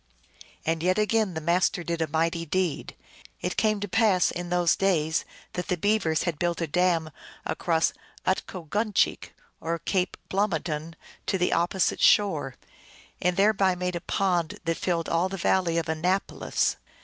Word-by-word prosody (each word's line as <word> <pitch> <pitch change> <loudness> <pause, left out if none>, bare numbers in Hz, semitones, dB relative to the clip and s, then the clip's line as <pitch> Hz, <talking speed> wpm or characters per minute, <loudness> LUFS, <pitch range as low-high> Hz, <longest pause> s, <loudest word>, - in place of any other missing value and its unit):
And 160 0 0
yet 185 +3 +2
again 215 -3 +1
the - - -1
Master 175 +2 +1
did 170 -1 -2
a 160 - +1
mighty 165 +2 0
deed. 175 -1 -2 0.4
It 180 - -3
came 215 -1 +2
to 205 - -2
pass 205 -3 +3
in 175 0 -5
those 175 -1 +3
days 160 -5 +1 0.3
that 180 - -4
the 180 - 0
Beavers 190 -4 +1
had 170 -4 -2
built 175 -1 0
a 165 - 0
dam 165 0 +1 0.3
across 165 -2 +1 0.3
from 185 - +4
Utkoguncheek, 195 +4 -1 0.2
or 165 +1 -2
Cape 185 +1 -1
Blomidon, 165 -5 -1 0.3
to 190 - +1
the 180 0 +1
opposite 175 +2 +1
shore, 155 -11 +3 0.7
and 180 0 +1
thereby 195 -2 +3
made 180 0 -2
a 170 - -3
pond 175 -3 0
that 165 0 0
filled 170 -2 -1
all 170 +3 +1
the 195 - -5
valley 170 -1 +1
of 165 - -1
Annapolis. 180 +5 0
175 Hz, 160 wpm, -26 LUFS, 165-190 Hz, 0.7 s, from